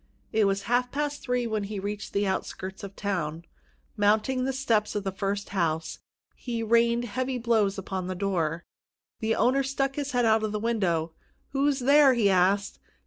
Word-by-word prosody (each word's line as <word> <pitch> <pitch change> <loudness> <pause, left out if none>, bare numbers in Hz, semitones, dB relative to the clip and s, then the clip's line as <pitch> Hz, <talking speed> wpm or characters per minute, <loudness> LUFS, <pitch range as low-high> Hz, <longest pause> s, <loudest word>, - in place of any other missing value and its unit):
It 220 -1 +3
was 195 0 0
half 245 +1 +1
past 290 0 -2
three 250 -1 -1
when 215 -3 -2
he 205 +1 -5
reached 205 +1 -5
the 200 +1 0
outskirts 190 +1 -4
of 200 0 -8
the - - -15
town. 170 -5 -2 0.5
Mounting 220 +5 +2
the 270 - 0
steps 230 -6 0
of 205 - -1
the 195 - -2
first 200 +1 -3
house, 165 -4 -1 0.3
he 235 -2 -4
rained 235 +1 +3
heavy 255 +3 -2
blows 225 -4 +1
upon 190 -1 -4
the 185 - -3
door. 170 -4 -1 0.5
The 225 -1 0
owner 255 +4 +3
stuck 275 0 -1
his 285 -2 -3
head 245 -1 +2
out 220 0 +4
of 215 -1 -2
a - - +1
window. 190 -8 0 0.4
"Who's 275 0 +1
there?" 280 0 +6
he 210 -4 +3
asked. 195 +2 +2
215 Hz, 185 wpm, -27 LUFS, 195-250 Hz, 0.5 s, there